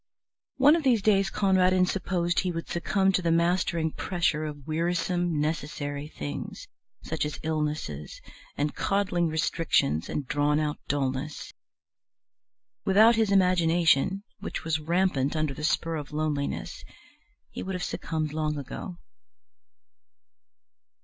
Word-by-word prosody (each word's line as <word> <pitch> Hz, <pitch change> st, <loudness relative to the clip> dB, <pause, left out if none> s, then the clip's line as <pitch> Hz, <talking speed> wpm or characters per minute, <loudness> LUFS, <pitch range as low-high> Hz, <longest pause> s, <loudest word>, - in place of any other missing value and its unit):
One 285 Hz, +4 st, +6 dB
of 335 Hz, -, 0 dB
these 245 Hz, -8 st, +2 dB
days 195 Hz, -2 st, +3 dB
Conradin 185 Hz, -2 st, +3 dB
supposed 180 Hz, -2 st, 0 dB
he 185 Hz, -, 0 dB
would 165 Hz, -1 st, -5 dB
succumb 190 Hz, +3 st, +1 dB
to 185 Hz, -, +1 dB
the 170 Hz, -, 0 dB
mastering 170 Hz, -1 st, +1 dB
pressure 165 Hz, -4 st, -1 dB
of 145 Hz, -3 st, -7 dB
wearisome 175 Hz, +1 st, 0 dB
necessary 145 Hz, -1 st, -3 dB
things 75 Hz, -, -6 dB, 0.4 s
such 160 Hz, -, -2 dB
as 150 Hz, 0 st, -4 dB
illnesses 150 Hz, -, -3 dB, 0.4 s
and 145 Hz, +1 st, 0 dB
coddling 185 Hz, -4 st, 0 dB
restrictions 155 Hz, -, +1 dB
and 145 Hz, -, -3 dB
drawn 145 Hz, +2 st, +1 dB
out 150 Hz, -1 st, -2 dB
dullness. 140 Hz, +1 st, -2 dB, 1.3 s
Without 220 Hz, +4 st, +6 dB
his 220 Hz, -2 st, +2 dB
imagination, 180 Hz, -1 st, +3 dB, 0.2 s
which -, -, -5 dB
was 160 Hz, -1 st, 0 dB
rampant 160 Hz, -3 st, +1 dB
under 155 Hz, -3 st, 0 dB
the 150 Hz, -, -8 dB
spur 165 Hz, +1 st, 0 dB
of 145 Hz, -1 st, -7 dB
loneliness, 150 Hz, -2 st, -2 dB, 0.7 s
he -, -, -6 dB
would 190 Hz, 0 st, -4 dB
have 180 Hz, -, -3 dB
succumbed 155 Hz, -2 st, -3 dB
long 155 Hz, -1 st, -1 dB
ago. 160 Hz, +6 st, -7 dB
165 Hz, 125 wpm, -27 LUFS, 150-185 Hz, 1.3 s, One